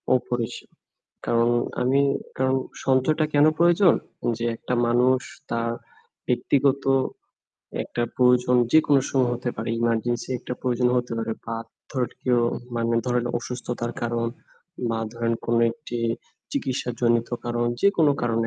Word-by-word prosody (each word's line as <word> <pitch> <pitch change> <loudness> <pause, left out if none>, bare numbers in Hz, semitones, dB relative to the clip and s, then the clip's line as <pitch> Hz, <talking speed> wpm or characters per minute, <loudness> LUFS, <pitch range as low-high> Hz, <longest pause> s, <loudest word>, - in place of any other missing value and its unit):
অপরিসীম। 120 -2 -2 0.6
কারণ 115 0 +3 0.3
আমি 135 +3 +3 0.4
কারণ 130 0 +2 0.3
সঞ্চয়টা 135 +4 +3
কেনো 145 +2 +6
প্রয়োজন? 175 +2 +5 0.4
যে 120 - -2
একটা 125 - -4
মানুষ 125 +2 +3 0.3
তার 115 0 0 0.6
ব্যক্তিগত 135 +2 +2 1.0
একটা 120 - -3
প্রয়োজন 125 0 +4 0.2
যেকোনো 150 -3 +5
সময় 130 -3 +2
হতে 120 0 -3
পারে। 110 - -4
এমার্জেন্সি 120 +1 0
একটা 125 - -6
প্রয়োজন 125 -1 +1
হতে 125 -1 -1
পারে। 115 0 -2
বা 115 0 -3 0.3
ধরেন 130 -4 -1
কেউ 125 -2 +3 0.3
মানে 115 0 0
ধরেন 125 -1 +1
অসুস্থতার 120 -1 -4
কারণ 115 0 0 0.6
বা 115 - -1 0.2
ধরেন 115 0 0
কোনো 115 0 +2
একটি 120 -4 -7 0.5
চিকিৎসাজনিত 120 - 0 0.2
কারণ 120 0 0 0.2
যেকোনো 165 -7 +4
কারণে 115 -1 +1
125 Hz, 125 wpm, -24 LUFS, 120-130 Hz, 1.0 s, কেনো